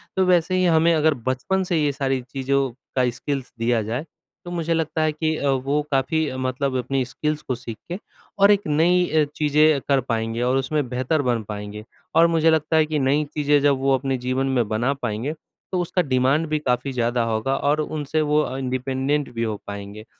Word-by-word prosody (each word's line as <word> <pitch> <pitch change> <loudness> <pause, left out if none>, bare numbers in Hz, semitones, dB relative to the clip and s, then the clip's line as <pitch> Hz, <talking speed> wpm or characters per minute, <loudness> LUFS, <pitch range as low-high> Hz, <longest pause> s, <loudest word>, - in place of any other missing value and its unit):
तो 190 0 +3
वैसे 180 0 +3
ही 185 0 +2
हमें 165 0 +4
अगर 155 -1 +3
बचपन 185 +10 0
से 175 -2 0
ये 145 - +2
सारी 135 -1 -1
चीज़ों 135 +1 -1 0.3
का 125 -1 +3
स्किल्स 135 +2 -4
दिया 115 -1 +1
जाए 120 +9 -3 0.4
तो 175 - -6
मुझे 165 -1 -1
लगता 160 -1 -1
है 155 - +2
कि 155 +1 -1
अ, 140 - 0
वो 135 +3 +1
काफ़ी 145 +3 +1
मतलब 130 +1 -1
अपनी 130 +1 -1
स्किल्स 150 +4 -3
को 130 - -3
सीख 115 -3 -8
के 185 - -3 0.4
और 200 +1 +7
एक 205 -4 +2
नई 175 +4 +3
अ, 155 -1 +3
चीज़ें 150 -1 +3
कर 135 -2 +3
पाएँगे 115 +1 -1
और 125 +2 +2
उसमें 140 0 -1
बेहतर 130 +4 0
बन 120 -4 0
पाएँगे। 105 0 -6 0.3
और 165 +1 +6
मुझे 165 -1 +3
लगता 160 0 +2
है 155 - +4
कि 155 -1 -1
नई 140 +3 +2
चीज़ें 145 -1 +3
जब 140 -2 +3
वो 135 0 +2
अपने 135 0 -2
जीवन 135 +1 0
में 115 -3 +2
बना 120 +6 +1
पाएँगे 120 +2 -3 0.4
तो 185 - 0
उसका 180 +1 0
डिमांड 135 +2 +2
भी 155 0 0
काफ़ी 135 0 -1
ज़्यादा 120 0 0
होगा 115 +4 0
और 145 +2 +1
उनसे 155 0 -2
वो 150 0 +2
अ, 130 -2 -3
इंडिपेंडेंट 130 +2 -1
भी 115 0 -2
हो 110 -2 -2
पाएँगे। 100 +1 -7
140 Hz, 205 wpm, -23 LUFS, 125-155 Hz, 0.4 s, और